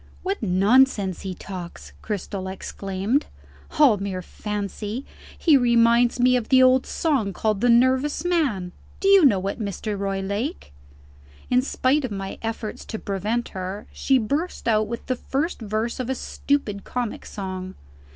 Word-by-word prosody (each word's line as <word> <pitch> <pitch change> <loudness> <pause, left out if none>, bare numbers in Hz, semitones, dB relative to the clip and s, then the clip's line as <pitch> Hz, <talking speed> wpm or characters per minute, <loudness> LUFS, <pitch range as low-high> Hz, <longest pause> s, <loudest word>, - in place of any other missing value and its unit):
"What 390 +2 -2
nonsense 200 0 +3
he 190 -2 -5
talks!" 170 - -8
Cristel 195 -2 -4
exclaimed. 195 +6 -2 0.5
"All 280 -8 +6
mere 190 -2 -4
fancy! 210 +5 -5 0.3
He 320 -4 +4
reminds 235 0 +4
me 250 +1 +5
of 245 -3 -1
the 260 -1 +6
old 255 0 +4
song 265 - 0
called 215 +2 -1
'The 245 - +3
Nervous 260 +6 +3
Man.' 270 - 0 0.3
Do 390 - 0
you 395 -2 +7
know 200 -9 +4
it, 200 - -3
Mr. 210 0 -3
Roylake?" 200 - -3 0.8
In 250 0 +5
spite 275 +2 +1
of 255 - -2
my 195 -2 -5
efforts 225 -1 -4
to 220 - -5
prevent 210 +4 -2
her, 190 +2 -5
she 270 - +2
burst 285 +10 -2
out 215 -2 +3
with 235 +1 -6
the 255 - -1
first 285 +4 -2
verse 220 +3 -2
of 255 -1 -3
a 265 - 0
stupid 235 -8 -2
comic 245 -3 -4
song. 185 -2 -6
220 Hz, 150 wpm, -24 LUFS, 195-260 Hz, 0.8 s, you